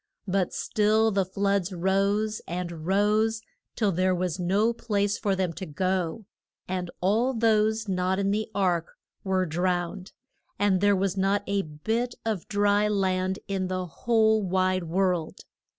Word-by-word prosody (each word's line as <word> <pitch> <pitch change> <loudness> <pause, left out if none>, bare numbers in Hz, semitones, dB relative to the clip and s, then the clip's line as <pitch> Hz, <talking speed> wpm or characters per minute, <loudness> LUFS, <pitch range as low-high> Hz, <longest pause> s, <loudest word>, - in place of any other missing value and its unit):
But 190 -1 0
still 220 0 +2
the 195 -2 +1
floods 195 0 0
rose 200 +4 0
and 170 -2 -5
rose 215 +3 +2 0.3
till 210 -4 +1
there 185 +1 +1
was 180 0 -2
no 200 +6 +2
place 205 -3 0
for 200 -2 0
them 185 -3 -1
to 185 +2 -7
go, 185 +5 -2 0.4
and 180 -1 -3
all 225 +8 +2
those 220 -1 +2
not 185 0 0
in 200 0 +1
the 215 +1 -1
ark 180 -4 0 0.3
were 190 -1 +1
drowned, 180 +2 -2 0.5
and 195 -2 +2
there 205 0 +4
was 195 0 -1
not 195 +1 +1
a 200 0 0
bit 220 +11 -3
of 215 -6 -2
dry 205 0 +2
land 190 -2 0
in 190 -2 -1
the 185 0 -2
whole 220 +6 +2
wide 185 -1 0
world. 180 -1 -1
195 Hz, 150 wpm, -26 LUFS, 185-210 Hz, 0.5 s, there